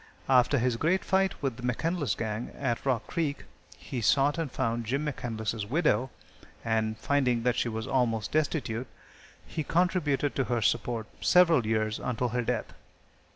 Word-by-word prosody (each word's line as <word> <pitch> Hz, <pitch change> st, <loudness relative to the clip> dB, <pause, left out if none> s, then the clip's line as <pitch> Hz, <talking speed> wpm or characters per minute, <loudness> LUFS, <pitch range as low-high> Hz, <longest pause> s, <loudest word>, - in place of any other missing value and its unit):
After 130 Hz, +2 st, +4 dB
his 125 Hz, -1 st, +1 dB
great 170 Hz, +8 st, +1 dB
fight 190 Hz, 0 st, +1 dB
with 130 Hz, -4 st, -1 dB
the -, -, -9 dB
McCandlas 140 Hz, -, -1 dB
gang, 110 Hz, +1 st, -3 dB
at 120 Hz, -4 st, -1 dB
Rock 125 Hz, -4 st, +1 dB
Creek, 155 Hz, -5 st, -2 dB, 0.3 s
he 125 Hz, -, -5 dB
sought 140 Hz, +7 st, +3 dB
and 160 Hz, -5 st, -2 dB
found 115 Hz, -3 st, -1 dB
Jim 140 Hz, +5 st, -1 dB
McCandlas' 110 Hz, -6 st, -3 dB
widow, 145 Hz, -3 st, +2 dB, 0.6 s
and, 110 Hz, -1 st, 0 dB
finding 125 Hz, -4 st, +1 dB
that 125 Hz, 0 st, +2 dB
she 125 Hz, -, 0 dB
was 110 Hz, 0 st, -4 dB
almost 120 Hz, -5 st, 0 dB
destitute, 135 Hz, -6 st, -1 dB, 0.6 s
he 155 Hz, -, -4 dB
contributed 160 Hz, -5 st, +1 dB
to 135 Hz, -, +1 dB
her 120 Hz, -3 st, 0 dB
support 115 Hz, +1 st, 0 dB, 0.2 s
several 165 Hz, -10 st, +5 dB
years 110 Hz, -1 st, 0 dB
and -, -, -6 dB
until 125 Hz, 0 st, -1 dB
her 125 Hz, +2 st, -1 dB
death. 120 Hz, -1 st, -2 dB
125 Hz, 160 wpm, -29 LUFS, 115-145 Hz, 0.6 s, several